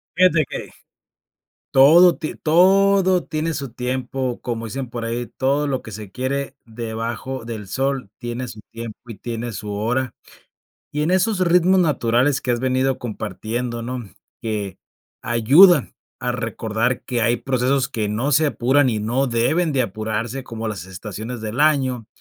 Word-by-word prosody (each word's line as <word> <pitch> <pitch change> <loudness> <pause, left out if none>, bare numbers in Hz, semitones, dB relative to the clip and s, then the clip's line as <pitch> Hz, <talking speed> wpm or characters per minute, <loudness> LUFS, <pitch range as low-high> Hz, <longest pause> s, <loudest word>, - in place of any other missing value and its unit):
Fíjate 170 -4 +4
que - - -6 1.0
todo 165 +6 +7
ti 155 - -5
todo 190 +2 +4
tiene 160 +1 -2
su 140 -6 -5
tiempo, 125 0 -3
como 115 -2 -4
dicen 130 +3 -5
por 120 -1 -5
ahí: 120 +1 -2
"Todo 140 +4 0
lo 135 -2 -2
que 110 - -10
se 105 -1 -8
quiere 135 +1 -3
debajo 115 +2 -5
del 110 -3 -6
sol, 135 0 -2
tiene 120 +1 -4
su 110 - -9
tiempo 115 -1 -7
y 115 - -7
tiene 120 0 -4
su 105 +1 -5
hora", 120 +5 -1 0.8
y 150 - -1
en 155 - +1
esos 190 +2 +2
ritmos 180 +1 +4
naturales 135 -3 +2
que 125 - -1
has 120 -1 +1
venido 130 +1 +1
compartiendo, 115 +1 -4
¿no?, 125 +1 -4 0.4
que 105 -4 -3 0.4
ayudan 135 - +5 0.3
a - - -1
recordar 115 +3 -2
que 120 -2 -1
hay 120 +1 +3
procesos 130 +2 0
que 110 -2 -2
no 115 +7 -1
se 155 +3 +4
apuran 130 +2 +2
y 110 - -1
no 120 +6 0
deben 150 +8 +1
de 135 -2 +2
apurarse 110 +4 -3
como 115 -3 -5
las 105 -4 -5
estaciones 110 +5 -7
del 110 +4 -4
año, 130 -6 +2
125 Hz, 155 wpm, -21 LUFS, 115-140 Hz, 1.0 s, todo